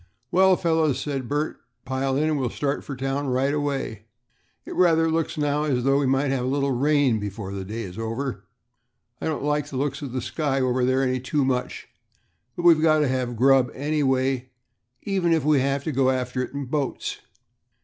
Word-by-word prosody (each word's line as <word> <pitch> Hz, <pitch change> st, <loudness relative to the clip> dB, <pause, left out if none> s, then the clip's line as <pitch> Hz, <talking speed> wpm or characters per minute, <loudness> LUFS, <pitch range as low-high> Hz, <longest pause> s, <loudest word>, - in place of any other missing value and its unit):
"Well, 190 Hz, +1 st, +5 dB
fellows," 160 Hz, -5 st, +1 dB
said 135 Hz, -3 st, -3 dB
Bert, 150 Hz, +2 st, -1 dB, 0.3 s
"pile 130 Hz, +1 st, -1 dB
in, 150 Hz, -, +1 dB
and 155 Hz, -2 st, +1 dB
we'll 130 Hz, -2 st, 0 dB
start 140 Hz, +3 st, -2 dB
for 140 Hz, -, -6 dB
town 135 Hz, +2 st, -2 dB
right 130 Hz, +2 st, +1 dB
away. 135 Hz, -7 st, -2 dB, 0.6 s
It -, -, -7 dB
rather 165 Hz, -2 st, +3 dB
looks 165 Hz, 0 st, -1 dB
now 145 Hz, 0 st, 0 dB
as 130 Hz, -5 st, 0 dB
though 135 Hz, +1 st, +3 dB
we 140 Hz, -, +1 dB
might 135 Hz, +1 st, +1 dB
have 130 Hz, -2 st, -1 dB
a -, -, -1 dB
little 140 Hz, +1 st, 0 dB
rain 135 Hz, -2 st, +2 dB
before 100 Hz, -1 st, -5 dB
the 95 Hz, -1 st, -4 dB
day 110 Hz, +4 st, -5 dB
is 95 Hz, 0 st, -8 dB
over. 115 Hz, +4 st, -3 dB, 0.8 s
I -, -, -2 dB
don't 155 Hz, -3 st, -2 dB
like 150 Hz, 0 st, 0 dB
the 140 Hz, -, -6 dB
looks 140 Hz, +1 st, -2 dB
of 140 Hz, -4 st, -5 dB
the 130 Hz, -, -2 dB
sky 145 Hz, -4 st, -1 dB
over 130 Hz, -1 st, +1 dB
there 130 Hz, +1 st, +2 dB
any 130 Hz, -1 st, 0 dB
too 135 Hz, +2 st, 0 dB
much, 125 Hz, -1 st, -2 dB, 0.7 s
but 175 Hz, -, -5 dB
we've 165 Hz, -3 st, +6 dB
got 155 Hz, -1 st, +4 dB
to 150 Hz, -, +2 dB
have 125 Hz, -2 st, -1 dB
grub 130 Hz, +1 st, +4 dB
anyway, 135 Hz, -3 st, 0 dB, 0.5 s
even 190 Hz, -4 st, +1 dB
if 160 Hz, -4 st, +1 dB
we 150 Hz, -2 st, +4 dB
have 135 Hz, +1 st, 0 dB
to 155 Hz, -, -2 dB
go 135 Hz, -1 st, +2 dB
after 125 Hz, -1 st, -1 dB
it 125 Hz, -, -4 dB
in 140 Hz, 0 st, -4 dB
boats." 140 Hz, +1 st, -3 dB
135 Hz, 200 wpm, -24 LUFS, 130-150 Hz, 0.8 s, we've